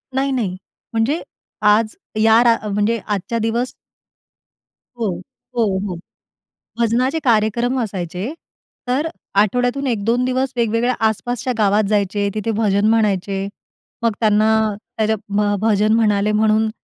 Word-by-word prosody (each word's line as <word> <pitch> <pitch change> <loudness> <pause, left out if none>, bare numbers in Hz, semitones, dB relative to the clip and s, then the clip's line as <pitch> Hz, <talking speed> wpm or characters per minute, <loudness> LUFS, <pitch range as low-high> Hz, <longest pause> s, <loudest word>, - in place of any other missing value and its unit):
नाही, 275 +1 +1
नाही. 210 -8 -1 0.4
म्हणजे 235 +9 +1 0.5
आज 215 +1 +3 0.3
या 225 +1 +6
रा 230 -1 +4
म्हणजे 210 +3 +1
आजच्या 210 +2 -2
दिवस 230 +3 -1 1.3
हो, 220 - 0 0.5
हो, 215 -5 +1
हो. 180 - -4 0.8
भजनाचे 250 +6 +1
कार्यक्रम 235 +2 +2
असायचे, 190 - -4 0.5
तर 270 +6 0 0.3
आठवड्यातून 245 +6 0
1-2 230 +2 +1
दिवस 260 +1 -1
वेगवेगळ्या 235 +1 +1
आसपासच्या 245 +3 -2
गावात 210 0 +3
जायचे, 205 -1 +1
तिथे 215 +1 -1
भजन 205 -1 +2
म्हणायचे. 200 -3 +1 0.6
मग 230 - +3
त्यांना, 215 0 +3 0.5
त्या 220 - +2
ज्या 220 +1 +1 0.2
भ 205 0 +2
भजन 215 -1 +3
म्हणाले 210 -2 +2
म्हणून 215 +1 +2
220 Hz, 120 wpm, -19 LUFS, 210-240 Hz, 1.3 s, या